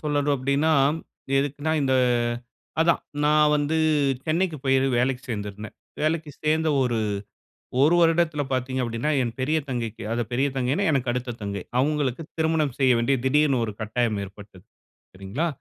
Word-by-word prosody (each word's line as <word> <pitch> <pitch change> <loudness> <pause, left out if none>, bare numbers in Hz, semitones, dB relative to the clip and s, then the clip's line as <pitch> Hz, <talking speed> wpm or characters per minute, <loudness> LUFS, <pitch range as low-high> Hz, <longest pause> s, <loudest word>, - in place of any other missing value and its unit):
சொல்லணும் 145 -1 +1
அப்டின்னா, 140 +4 +1 0.7
எதுக்குனா 145 +3 -1
இந்த 130 -1 +2 0.9
அதான், 165 +1 +3 0.2
நான் 150 0 +4
வந்து 150 +2 0 0.5
சென்னைக்கு 165 +1 0
போயி 135 0 +3 0.2
வேலைக்கு 125 +1 0
சேர்ந்திருந்தேன். 105 -1 -5 0.3
வேலைக்கு 155 0 0
சேர்ந்த 155 +1 +2
ஒரு, 120 -3 0 0.8
1 155 +5 +5
வருடத்துல 165 -2 +2
பாத்தீங்க 130 0 -1
அப்டின்னா, 115 +6 -1
என் 115 -1 -3
பெரிய 150 +5 +1
தங்கைக்கு 115 -3 -4
அத 120 +1 0
பெரிய 135 +3 +2
தங்கைனா, 135 +10 0
எனக்கு 130 -4 0
அடுத்த 125 -1 -3
தங்கை 100 -2 -4 0.2
அவங்களுக்கு 145 0 0 0.2
திருமணம் 160 -4 +1
செய்ய 130 -2 +4
வேண்டிய 135 +3 +2
திடீர்னு 140 -2 +3
ஒரு 110 - -5
கட்டாயம் 110 0 0
ஏற்பட்டது. 100 -2 -14 0.5
சரிங்களா, 100 - -3
135 Hz, 140 wpm, -24 LUFS, 120-155 Hz, 0.9 s, 1